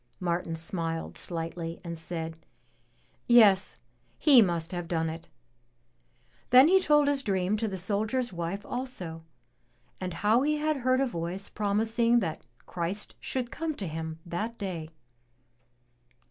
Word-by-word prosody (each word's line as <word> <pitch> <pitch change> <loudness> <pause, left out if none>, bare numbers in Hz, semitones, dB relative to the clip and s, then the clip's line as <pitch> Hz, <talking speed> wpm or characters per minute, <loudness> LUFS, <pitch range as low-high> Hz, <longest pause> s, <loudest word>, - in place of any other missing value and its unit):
Martin 170 -2 -1
smiled 165 0 -3
sUghtly 165 0 -4
and 170 -1 -5
said, 165 0 -4 0.9
"Yes, 210 -5 +5 0.4
He 275 -6 +7
must 170 -3 +1
have 175 -2 -4
done 165 -2 -1
it." 165 +1 -10 1.2
Then 255 +4 +8
he 380 +2 +5
told 295 -3 +4
his 285 -1 +1
dream 195 -3 0
to 220 +1 -1
the 190 -2 -4
soldier's 215 +5 -1
wife 175 +4 -4
also, 185 -11 -5 0.8
and 180 -2 -4
how 215 +7 +3
he 300 +2 +1
had 305 0 0
heard 255 0 +2
a - - +3
voice 180 -3 -4
promising 225 +3 +1
that 165 -7 -3 0.2
Christ 180 +4 -4
should 250 -2 -3
come 320 -1 -3
to 200 - -4
him 160 0 -5
that 215 +7 -4
day. 170 -5 -4
195 Hz, 135 wpm, -28 LUFS, 170-240 Hz, 1.2 s, Then